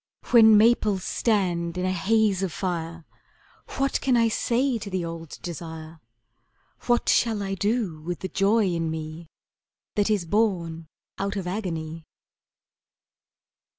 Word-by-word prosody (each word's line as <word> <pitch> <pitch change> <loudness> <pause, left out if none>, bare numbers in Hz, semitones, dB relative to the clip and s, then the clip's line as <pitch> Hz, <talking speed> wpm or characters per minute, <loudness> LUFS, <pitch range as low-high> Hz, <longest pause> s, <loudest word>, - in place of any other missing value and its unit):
When 220 -3 +8
maples 215 -3 +3
stand 180 -6 0
in 180 - -1
a 185 - +1
haze 195 +2 +2
of 190 -3 -1
fire 165 -2 -4 0.7
What 275 0 0
can 260 -3 +2
I 230 -1 +3
say 240 +2 0
to 205 - -7
the 185 -3 -2
old 165 -2 -7
desire, 160 -1 -7 0.9
What 240 0 +2
shall 220 -3 +2
I 195 0 -3
do 200 -5 -1
with 175 0 -5
the 190 - -3
joy 200 +4 +2
in 165 -3 -1
me 160 +1 -6 0.7
That 205 0 +1
is 205 -5 +1
born 170 -5 0 0.3
out 200 +1 -2
of 195 -3 -3
agony? 165 -5 -4
190 Hz, 135 wpm, -25 LUFS, 165-215 Hz, 0.9 s, When